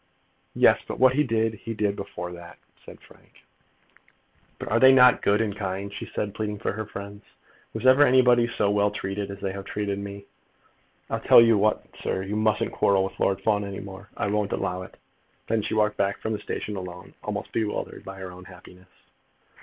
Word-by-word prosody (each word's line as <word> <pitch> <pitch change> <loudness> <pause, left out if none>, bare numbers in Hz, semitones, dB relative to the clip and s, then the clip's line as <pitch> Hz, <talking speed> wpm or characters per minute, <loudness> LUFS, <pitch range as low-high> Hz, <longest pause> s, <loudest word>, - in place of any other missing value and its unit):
"Yes; - - +5
but - - -5
what 130 0 +5
he 150 +3 +2
did, 115 -3 0
he 115 +1 -7
did 105 -1 0
before 90 -3 -6
that," 85 0 -11 0.3
said - - -13
Frank. - - -21 1.1
"But - - -6
are 115 - +3
they 130 +1 +8
not 125 -1 +6
good 105 +2 +2
and 105 -3 -2
kind?" 100 0 -4
she - - -6
said, 105 -1 -4
pleading 105 -1 -3
for - - -2
her 110 0 -5
friends. 100 0 -9 0.5
"Was - - -6
ever 130 +2 +6
anybody 125 -3 +5
so 105 -3 0
well 105 0 +2
treated 100 0 -4
as 100 0 -7
they 95 -1 -2
have 100 0 -7
treated 100 -1 -3
me? 100 0 -8 0.9
I'll - - -1
tell - - +7
you 115 -1 +6
what, 105 +1 +1
sir, 95 - -2
you 100 +2 -4
mustn't 110 0 +1
quarrel 100 -1 +2
with 95 - -6
Lord 95 0 +1
Fawn 105 0 +1
any 100 -1 -6
more. 95 +1 -10
I - - -1
won't 105 0 -1
allow 90 +1 -2
it." 90 - -11 0.5
Then 115 -1 0
she 105 - -3
walked 105 -1 +1
back 100 0 0
from 110 - -3
the 105 - -3
station 105 -1 -5
alone, 90 -1 -8
almost - - -5
bewildered 110 -2 -3
by 95 0 -9
her 95 -1 -7
own 90 0 -12
happiness. 90 0 -15
100 Hz, 200 wpm, -25 LUFS, 95-110 Hz, 1.1 s, they